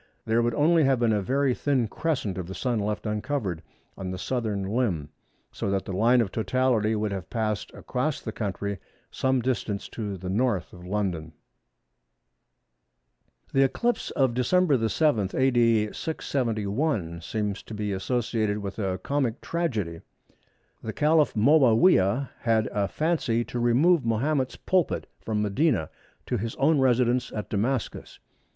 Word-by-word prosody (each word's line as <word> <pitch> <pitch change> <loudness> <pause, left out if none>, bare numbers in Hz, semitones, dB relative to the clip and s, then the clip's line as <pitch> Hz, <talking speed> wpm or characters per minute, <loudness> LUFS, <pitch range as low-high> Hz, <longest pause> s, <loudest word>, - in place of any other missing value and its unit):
there 115 +1 +2
would 120 -1 0
only 160 +3 +4
have 135 -2 +3
been 115 -2 +3
a 105 - +1
very 135 +6 +1
thin 130 -3 0
crescent 130 - -2
of 90 -2 -5
the 95 - -7
Sun 120 -4 -1
left 105 -2 -2
uncovered 105 - -2 0.3
on 95 -1 -5
the 95 - -4
southern 110 -2 -2
limb, 95 - -1 0.4
so - - -3
that 95 -1 -1
the 95 - -5
line 120 +6 +4
of 100 -4 -2
totality 115 -2 +1
would 105 -1 -1
have 95 -2 -5
passed 110 -3 -2
across 135 +4 -2
the 110 - -5
country 100 -2 -3 0.3
some 130 -2 +1
distance 115 -5 -2
to 105 -4 -5
the 95 - -11
N. 95 +4 0
of 90 -7 -2
London. 90 -6 -2 2.2
The 135 - +4
eclipse 235 - +1
of 130 -3 +1
Dec. 130 -2 +2
7, 115 -9 +2
A.D. 115 -5 +3
671, 110 - -2
seems 105 +1 -3
to 110 - -9
be 105 -1 -2
associated 110 +1 -1
with 100 0 -6
a 95 -3 -1
comic 130 +3 -1
tragedy. 110 - -2 0.8
The 110 - -5
Caliph 155 -1 +3
Moawiyah 125 - +4
had 110 -2 +2
a 100 -1 0
fancy 150 - 0
to 120 - -5
remove 135 +7 +4
Mahomet's 130 +4 0
pulpit 185 -6 0
from 105 -1 -2
Medina 105 - +1 0.3
to 125 - -1
his 115 +2 -4
own 150 +2 +3
residence 125 -1 +2
at 105 - -5
Damascus. 115 +4 -2
115 Hz, 145 wpm, -26 LUFS, 100-130 Hz, 2.2 s, only